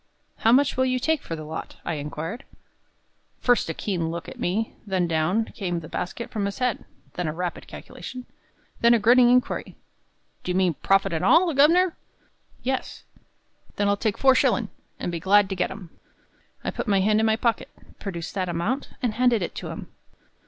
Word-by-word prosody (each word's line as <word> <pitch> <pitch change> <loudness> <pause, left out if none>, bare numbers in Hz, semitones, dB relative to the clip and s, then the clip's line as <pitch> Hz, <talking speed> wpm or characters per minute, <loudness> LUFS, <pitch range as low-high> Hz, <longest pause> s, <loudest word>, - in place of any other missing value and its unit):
"How 225 - +3
much 265 +2 +4
will 260 - +3
you 255 0 +1
take 315 +4 +1
for 165 - -5
the 155 - -7
lot?" 155 +1 -6
I 170 - -1
inquired. 155 - -5 1.0
First 245 -8 +2
a - - -1
keen 175 -5 -2
look 170 0 -5
at - - -10
me, 215 +6 -1
then 185 -3 +1
down 170 +7 +1
came 175 -4 -2
the 160 - -9
basket 180 +9 -5
from 210 -3 -1
his 200 - -5
head, 250 -3 -1 0.3
then 180 -2 -2
a 155 - -2
rapid 175 +1 -4
calculation, 255 -1 -9 0.5
then 235 0 +6
a - - +2
grinning 240 +3 +6
inquiry, 250 0 +1 0.7
"Do - - -6
you - - -1
mean 185 -2 +3
profit 195 +4 +2
an' 160 - -1
all, 330 +4 +5
governor?" 330 +6 +4 0.7
"Yes." 260 +1 -3 0.7
"Then 205 - +1
I'll 200 - +3
take 210 0 -1
four 265 -1 +5
shillin', - - +2 0.3
and - - -3
be 170 - -3
glad 195 +4 +4
to 190 - -2
get 180 - 0
'em." 180 -6 -9 0.7
I - - -2
put - - -4
my 200 -2 +3
hand 210 +2 +3
in 220 - +3
my 220 - +3
pocket, 230 -1 0 0.3
produced 175 -5 -5
that 185 -2 -2
amount, 175 +11 -2
and 235 -3 +1
handed 240 -3 +3
it - - -4
to - - -6
him. - - -7
205 Hz, 195 wpm, -25 LUFS, 175-245 Hz, 1.0 s, then